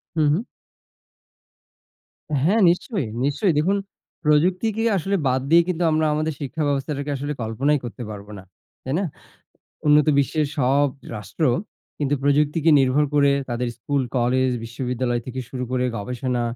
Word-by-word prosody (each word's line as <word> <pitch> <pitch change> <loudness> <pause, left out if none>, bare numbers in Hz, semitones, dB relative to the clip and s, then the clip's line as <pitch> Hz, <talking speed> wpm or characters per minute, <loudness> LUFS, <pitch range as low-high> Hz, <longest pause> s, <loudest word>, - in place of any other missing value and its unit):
হু, 160 - +1
হুম। 180 +9 +1 2.0
হ্যা, 175 +9 +3
নিশ্চয়ই, 180 - -1 0.2
নিশ্চয়ই। 160 +5 +1
দেখুন, 185 +7 +2 0.5
প্রযুক্তিকে 185 +9 +2
আসলে 195 +3 -1
বাদ 130 0 +1
দিয়ে 170 +2 +7
কিন্তু 175 -1 -1
আমরা 155 0 +2
আমাদের 155 +1 -1
শিক্ষা 140 +3 -3
ব্যবস্থাকে 140 +1 -2
আসলে 145 +2 -3
কল্পনাই 130 +7 +1
করতে 120 +1 -6
পারব 100 -1 -8
না। 95 - -10 0.4
তাই 130 - -3
না? 200 - 0 0.8
উন্নত 150 +1 +5
বিশ্বের 150 +2 +1
সব 140 +2 +3 0.3
রাষ্ট্র 105 +9 -3 0.5
কিন্তু 145 -1 +1
প্রযুক্তিকে 150 +3 +2
নির্ভর 135 +3 +3
করে 140 -1 +5 0.2
তাদের 120 +1 -2
স্কুল, 140 +4 -1
কলেজ, 130 +2 +2
বিশ্ববিদ্যালয় 120 0 -2
থেকে 130 +1 -4
শুরু 125 -1 -4
করে 125 0 0
গবেষণা, 125 +3 -2
140 Hz, 140 wpm, -23 LUFS, 125-155 Hz, 2.0 s, দিয়ে